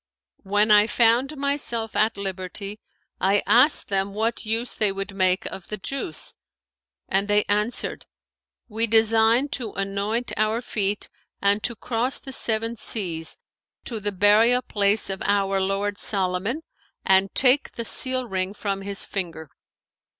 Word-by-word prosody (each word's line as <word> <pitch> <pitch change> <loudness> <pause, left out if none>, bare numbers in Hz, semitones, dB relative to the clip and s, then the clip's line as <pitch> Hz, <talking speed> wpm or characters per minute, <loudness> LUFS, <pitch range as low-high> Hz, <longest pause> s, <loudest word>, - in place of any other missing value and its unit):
When 205 +2 +1
I 210 0 +6
found 245 +6 +2
myself 275 -5 -1
at 215 0 +1
liberty, 195 +1 -5 0.4
I 195 +2 +2
asked 245 +8 +4
them 195 0 -1
what 225 +1 -2
use 230 +2 0
they 210 -2 +1
would 195 +1 -5
make 185 -1 +1
of 190 - -7
the 210 - -4
juice; 200 - -3 0.7
and 195 +1 0
they 205 0 +3
answered, 210 +4 -2 0.6
'We 225 0 0
design 225 +4 +4
to 240 -6 -4
anoint 200 +4 -2
our 215 +2 +1
feet 205 -4 -2 0.3
and 200 +1 +2
to 235 +3 -2
cross 240 +4 -1
the 265 - -9
Seven 225 -1 -1
Seas 170 -8 -2 0.5
to 230 -3 -4
the 205 0 -2
burial 215 +6 +4
place 205 +1 +1
of 190 - -6
our 195 -1 +1
lord 200 +1 -1
Solomon[FN#519] 195 - +1 0.4
and 190 0 +3
take 265 +2 +3
the 235 - -5
seal 255 +1 +1
ring 190 0 -2
from 200 -2 -3
his 200 0 -5
finger.' 165 -6 -5
210 Hz, 145 wpm, -23 LUFS, 195-230 Hz, 0.7 s, I